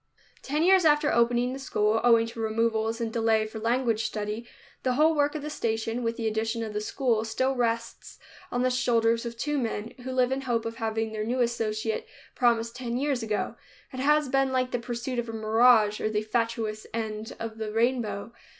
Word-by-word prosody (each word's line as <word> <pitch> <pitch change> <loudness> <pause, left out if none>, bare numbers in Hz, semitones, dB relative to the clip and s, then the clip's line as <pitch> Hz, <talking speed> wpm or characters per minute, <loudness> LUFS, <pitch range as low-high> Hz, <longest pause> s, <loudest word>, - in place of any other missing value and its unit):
Ten 300 +3 -1
years 375 +1 +5
after 295 -1 +4
opening 240 +1 +2
the 270 - -6
school, 220 -4 +1
owing 230 -1 +5
to 230 0 -9
removals 225 0 0
and 225 -1 -3
delay 225 -1 +2
for 220 +1 -7
language 230 -1 +1
study, 215 +2 -4 0.3
the 255 - +1
whole 310 +5 +4
work 290 0 +1
of 300 - -4
the 300 - -4
station, 225 -2 -2
with 230 -1 -2
the 225 -2 -1
addition 220 +1 -1
of 215 -1 -5
the 210 - -2
school, 230 -1 0
still 260 +4 0
rests 230 -1 -2 0.3
on 245 0 0
the 255 - +2
shoulders 230 -2 +2
of 235 0 -7
two 295 +3 -1
men, 225 -2 -3
who 260 - -4
live 255 0 +2
in 265 +1 -1
hope 240 -4 -1
of 230 0 -5
having 220 -1 -2
their 215 -1 -3
new 245 +3 -1
associate, 225 -2 -1 0.3
promised 235 -1 +1
ten 245 -1 -3
years 275 -2 0
ago. 215 -2 -2 0.4
It 260 - -5
has 300 +2 +3
been 270 +1 +2
like 255 -1 0
the 245 - -1
pursuit 240 +1 -4
of 240 -1 -3
a - - -5
mirage 220 -1 +4
or 215 - 0
the 215 0 -1
fatuous 220 -1 -2
end 220 -1 -4
of 225 -1 -6
the 215 -1 -3
rainbow. 230 -2 0
230 Hz, 205 wpm, -27 LUFS, 220-255 Hz, 0.4 s, years